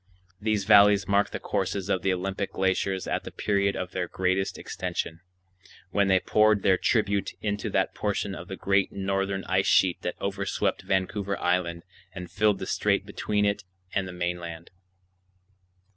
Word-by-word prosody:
These 105 Hz, -2 st, +1 dB
valleys 100 Hz, -1 st, +6 dB
mark 100 Hz, 0 st, +3 dB
the -, -, -5 dB
courses 95 Hz, 0 st, -2 dB
of 95 Hz, -3 st, 0 dB
the 95 Hz, -, +1 dB
Olympic 95 Hz, +2 st, -3 dB
glaciers 95 Hz, 0 st, 0 dB
at -, -, -2 dB
the -, -, -7 dB
period 100 Hz, -1 st, 0 dB
of 90 Hz, 0 st, -4 dB
their 90 Hz, -1 st, -2 dB
greatest 95 Hz, +2 st, -1 dB
extension, 80 Hz, 0 st, -4 dB, 0.7 s
when 100 Hz, +1 st, +2 dB
they 95 Hz, -1 st, +4 dB
poured 105 Hz, +1 st, +3 dB
their 95 Hz, -, +5 dB
tribute 100 Hz, -4 st, +1 dB
into 105 Hz, -1 st, -2 dB
that -, -, 0 dB
portion 100 Hz, -1 st, -2 dB
of 90 Hz, -2 st, -8 dB
the 95 Hz, -, -5 dB
great 95 Hz, 0 st, +1 dB
northern 95 Hz, 0 st, -1 dB
ice 95 Hz, +1 st, +1 dB
sheet 90 Hz, -2 st, +3 dB
that 90 Hz, -, -4 dB
overswept 100 Hz, 0 st, -1 dB
Vancouver 100 Hz, +1 st, -1 dB
Island 85 Hz, -1 st, 0 dB, 0.3 s
and 90 Hz, -1 st, -7 dB
filled 105 Hz, +2 st, +2 dB
the -, -, -5 dB
strait -, -, +1 dB
between 105 Hz, -1 st, -1 dB
it 100 Hz, 0 st, 0 dB, 0.3 s
and 95 Hz, -1 st, 0 dB
the -, -, -6 dB
mainland. 85 Hz, -2 st, -5 dB
95 Hz, 160 wpm, -27 LUFS, 95-100 Hz, 0.7 s, valleys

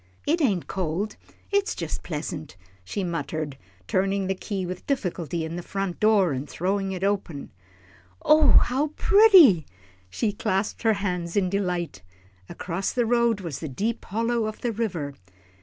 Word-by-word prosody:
"It 325 Hz, +3 st, +1 dB
ain't 200 Hz, -, +1 dB
cold 190 Hz, +3 st, -3 dB, 0.4 s
it's 405 Hz, 0 st, +1 dB
just -, -, -4 dB
pleasant," 155 Hz, -, -5 dB, 0.3 s
she 195 Hz, -, -4 dB
muttered, 160 Hz, -4 st, -3 dB, 0.3 s
turning 195 Hz, -, +1 dB
the 190 Hz, -, 0 dB
key 190 Hz, 0 st, -4 dB
with 180 Hz, +1 st, -7 dB
difficulty 175 Hz, -, -2 dB
in 165 Hz, +2 st, -5 dB
the -, -, -4 dB
front 195 Hz, 0 st, -4 dB
door, 210 Hz, -5 st, +4 dB
and 135 Hz, +2 st, -4 dB
throwing 195 Hz, +2 st, -1 dB
it 185 Hz, 0 st, -4 dB
open. 195 Hz, -, -2 dB, 0.7 s
"Oh, 310 Hz, 0 st, +6 dB
my, -, -, +7 dB
how 270 Hz, +5 st, 0 dB
pretty!" 395 Hz, -, +8 dB
and 155 Hz, -, -11 dB, 0.4 s
she 210 Hz, -, -1 dB
clasped 205 Hz, -1 st, -1 dB
her 225 Hz, -2 st, +3 dB
hands 180 Hz, -3 st, -2 dB
in 185 Hz, -3 st, +1 dB
delight. 180 Hz, -, -2 dB, 0.5 s
Across 185 Hz, +2 st, -3 dB
the 245 Hz, -2 st, +1 dB
road 235 Hz, -2 st, +2 dB
was 165 Hz, -7 st, -5 dB
the 155 Hz, -, -5 dB
deep 215 Hz, -, -2 dB
hollow 230 Hz, +2 st, 0 dB
of 215 Hz, -, -7 dB
the 240 Hz, -, 0 dB
river. 185 Hz, -11 st, -3 dB
195 Hz, 160 wpm, -25 LUFS, 170-225 Hz, 0.7 s, pretty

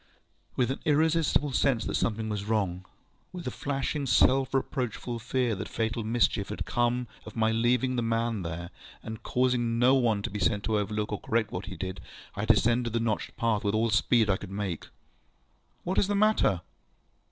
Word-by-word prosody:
With 125 Hz, 0 st, +1 dB
an 135 Hz, -, -3 dB
irresistible 155 Hz, -1 st, +2 dB
sense 130 Hz, -3 st, +1 dB
that -, -, -3 dB
something 110 Hz, 0 st, -1 dB
was 105 Hz, -2 st, -3 dB
wrong, 95 Hz, -4 st, -1 dB, 0.5 s
ŌĆöwith 175 Hz, -, -6 dB
a 125 Hz, -, -2 dB
flashing 140 Hz, 0 st, -2 dB
self 130 Hz, +1 st, +4 dB
reproachful 125 Hz, -3 st, -2 dB
fear 125 Hz, +1 st, 0 dB
that 100 Hz, +1 st, -5 dB
fatal 115 Hz, 0 st, -2 dB
mischief 110 Hz, -3 st, +1 dB
had 105 Hz, -, -4 dB
come 120 Hz, 0 st, 0 dB, 0.2 s
of -, -, -11 dB
my 110 Hz, -1 st, +2 dB
leaving 125 Hz, +3 st, +1 dB
the -, -, +1 dB
man 115 Hz, -2 st, 0 dB
there, 85 Hz, +1 st, -5 dB, 0.3 s
and 110 Hz, +1 st, -7 dB
causing 125 Hz, -2 st, +1 dB
no 125 Hz, +2 st, +5 dB
one 115 Hz, -6 st, +2 dB
to -, -, -3 dB
be 105 Hz, -, -4 dB
sent 100 Hz, 0 st, +1 dB
to 110 Hz, -1 st, +1 dB
overlook 105 Hz, +1 st, -2 dB
or 105 Hz, -, -2 dB
correct 110 Hz, -1 st, 0 dB
what 90 Hz, +3 st, -5 dB
he 95 Hz, -, -7 dB
did, 95 Hz, +2 st, -5 dB, 0.3 s
ŌĆöI -, -, -3 dB
descended 120 Hz, 0 st, +3 dB
the 115 Hz, -, +1 dB
notched 115 Hz, -2 st, -2 dB
path 115 Hz, -4 st, +1 dB
with 100 Hz, +1 st, +1 dB
all 115 Hz, +1 st, +2 dB
the 105 Hz, -, +2 dB
speed 115 Hz, 0 st, +3 dB
I 95 Hz, -2 st, +2 dB
could 100 Hz, -, -9 dB
make. 95 Hz, -4 st, -4 dB, 1.0 s
ŌĆ£What 185 Hz, +2 st, +1 dB
is 195 Hz, -, +2 dB
the 205 Hz, -, 0 dB
matter? 200 Hz, -, +3 dB
115 Hz, 190 wpm, -28 LUFS, 105-125 Hz, 1.0 s, no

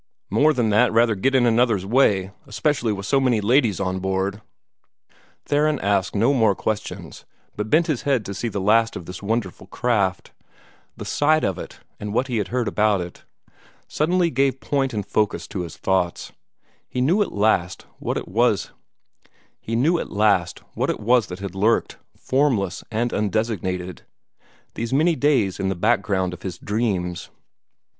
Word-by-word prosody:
More 155 Hz, +2 st, +4 dB
than 120 Hz, -7 st, 0 dB
that 115 Hz, +4 st, +4 dB
rather 115 Hz, 0 st, +3 dB
get 135 Hz, +7 st, 0 dB
in 130 Hz, -, +4 dB
one 120 Hz, -2 st, +3 dB
another's 115 Hz, -5 st, +2 dB
way, 100 Hz, -5 st, +2 dB, 0.2 s
especially 145 Hz, -7 st, 0 dB
with 100 Hz, -1 st, -4 dB
so 135 Hz, +7 st, +2 dB
many 125 Hz, -4 st, +2 dB
ladies 110 Hz, -, +2 dB
on 95 Hz, -1 st, -1 dB
board." 95 Hz, +2 st, -2 dB, 1.0 s
Theron 150 Hz, +1 st, +2 dB
asked 100 Hz, -1 st, 0 dB
no 115 Hz, +7 st, +3 dB
more 110 Hz, -6 st, +3 dB
questions, 110 Hz, +2 st, -4 dB, 0.3 s
but 105 Hz, +1 st, -4 dB
bent 160 Hz, +6 st, +4 dB
his 155 Hz, -7 st, -1 dB
head 135 Hz, -7 st, 0 dB
to 100 Hz, -, -5 dB
see 105 Hz, +4 st, -3 dB
the 105 Hz, -3 st, -3 dB
last 115 Hz, +4 st, +3 dB
of 85 Hz, -, -7 dB
this 90 Hz, +1 st, -8 dB
wonderful 105 Hz, -2 st, -3 dB
craft. 100 Hz, -7 st, -1 dB, 0.7 s
The -, -, -7 dB
sight 155 Hz, +2 st, +2 dB
of 95 Hz, -, -1 dB
it, -, -, -9 dB, 0.2 s
and 105 Hz, +1 st, -5 dB
what 130 Hz, +2 st, 0 dB
he 120 Hz, -, -1 dB
had 105 Hz, -, -1 dB
heard 125 Hz, -2 st, -1 dB
about 105 Hz, -2 st, +2 dB
it, 90 Hz, 0 st, -8 dB, 0.6 s
suddenly 170 Hz, +2 st, +1 dB
gave 135 Hz, +1 st, +1 dB
point 135 Hz, -2 st, -1 dB
and 105 Hz, -3 st, -3 dB
focus 100 Hz, -7 st, -1 dB
to 95 Hz, -, -4 dB
his 85 Hz, -3 st, -7 dB
thoughts. 95 Hz, -2 st, -1 dB, 0.6 s
He -, -, -4 dB
knew 165 Hz, +12 st, +3 dB
at 205 Hz, -, 0 dB
last 100 Hz, -4 st, 0 dB
what -, -, -2 dB
it -, -, -5 dB
was 110 Hz, 0 st, +1 dB, 1.0 s
that 110 Hz, -, 0 dB
had 95 Hz, -2 st, -6 dB
lurked, 105 Hz, +4 st, +1 dB, 0.2 s
formless 125 Hz, -10 st, 0 dB
and 115 Hz, +2 st, -1 dB
undesignated, 100 Hz, -4 st, -2 dB, 0.7 s
these 115 Hz, 0 st, -4 dB
many 160 Hz, +5 st, +3 dB
days 130 Hz, -12 st, +1 dB
in 95 Hz, 0 st, 0 dB
the 95 Hz, -, -1 dB
background 100 Hz, -2 st, +1 dB
of 90 Hz, -, -10 dB
his 95 Hz, -2 st, -5 dB
dreams. 95 Hz, -5 st, -2 dB
110 Hz, 160 wpm, -22 LUFS, 95-125 Hz, 1.0 s, More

